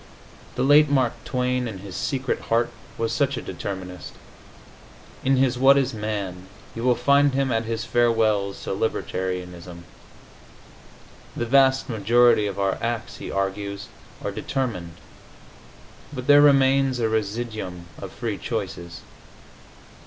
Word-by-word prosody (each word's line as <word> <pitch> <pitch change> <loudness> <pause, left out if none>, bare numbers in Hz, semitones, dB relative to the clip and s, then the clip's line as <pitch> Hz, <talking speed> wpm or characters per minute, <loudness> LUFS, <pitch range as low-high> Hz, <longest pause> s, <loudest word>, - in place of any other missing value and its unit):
The - - 0
late 145 +2 +6
Mark 130 -4 +2
Twain, 125 -1 -1
in 110 -4 -6
his 95 -1 -9
secret 130 -2 -2
heart, 115 +1 +2 0.3
was 115 0 -1
such 140 +1 +1
a - - -3
determinist. 90 -2 -6 1.1
In 135 +1 +3
his 130 -1 +2
"What 135 +1 +6
Is 135 -1 +1
Man?" 100 -4 -4 0.3
you 115 - -6
will 125 -1 +4
find 140 +2 +3
him 135 -1 +1
at 115 -1 0
his 115 0 -3
farewells 110 -5 +1
to - - -4
libertarianism. 90 -4 -3 1.5
The 120 - -1
vast 135 +2 +4
majority 115 0 +3
of 100 -1 -5
our 100 -1 0
acts, 115 -1 -3
he - - -7
argues, 100 +1 -3 0.4
are - - -1
determined, 105 -11 -3 1.2
but 130 -4 -6
there 145 +1 +7
remains 135 -2 +4
a 115 - +2
residuum 110 -4 -3 0.2
of - - -7
free - - -4
choices. 85 -1 -5
115 Hz, 130 wpm, -24 LUFS, 100-130 Hz, 1.5 s, there